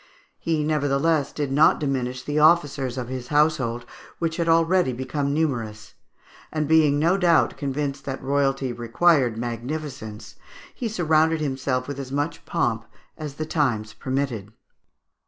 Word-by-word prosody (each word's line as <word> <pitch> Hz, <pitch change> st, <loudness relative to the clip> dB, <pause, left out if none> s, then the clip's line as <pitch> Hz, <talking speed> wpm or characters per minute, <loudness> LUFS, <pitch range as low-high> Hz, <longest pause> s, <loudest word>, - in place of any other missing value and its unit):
He 160 Hz, -2 st, 0 dB
nevertheless 150 Hz, 0 st, +1 dB
did 145 Hz, -3 st, -3 dB
not 150 Hz, +3 st, +5 dB
diminish 130 Hz, -3 st, -2 dB
the 150 Hz, +1 st, -1 dB
officers 145 Hz, -5 st, +3 dB
of 125 Hz, -2 st, -3 dB
his 130 Hz, -1 st, -5 dB
household, 140 Hz, -6 st, +1 dB, 0.3 s
which 165 Hz, -1 st, -2 dB
had 170 Hz, -1 st, 0 dB
already 165 Hz, -3 st, +3 dB
become 140 Hz, +3 st, -2 dB
numerous; 115 Hz, -9 st, -2 dB, 0.6 s
and 155 Hz, -2 st, -1 dB
being 155 Hz, -2 st, +4 dB
no 170 Hz, +6 st, +3 dB
doubt 175 Hz, -4 st, +3 dB
convinced 140 Hz, -1 st, -3 dB
that 135 Hz, -1 st, -4 dB
royalty 135 Hz, -1 st, 0 dB
required 120 Hz, +1 st, +2 dB
magnificence, 120 Hz, -1 st, -6 dB, 0.4 s
he 240 Hz, -4 st, -4 dB
surrounded 160 Hz, -4 st, +2 dB
himself 130 Hz, -3 st, -2 dB
with 140 Hz, -1 st, -5 dB
as 135 Hz, -1 st, -6 dB
much 145 Hz, +4 st, -2 dB
pomp 115 Hz, -9 st, -1 dB, 0.3 s
as 150 Hz, -3 st, -7 dB
the 155 Hz, -, -4 dB
times 120 Hz, -9 st, -1 dB
permitted. 130 Hz, -6 st, -3 dB
140 Hz, 140 wpm, -24 LUFS, 125-155 Hz, 0.6 s, not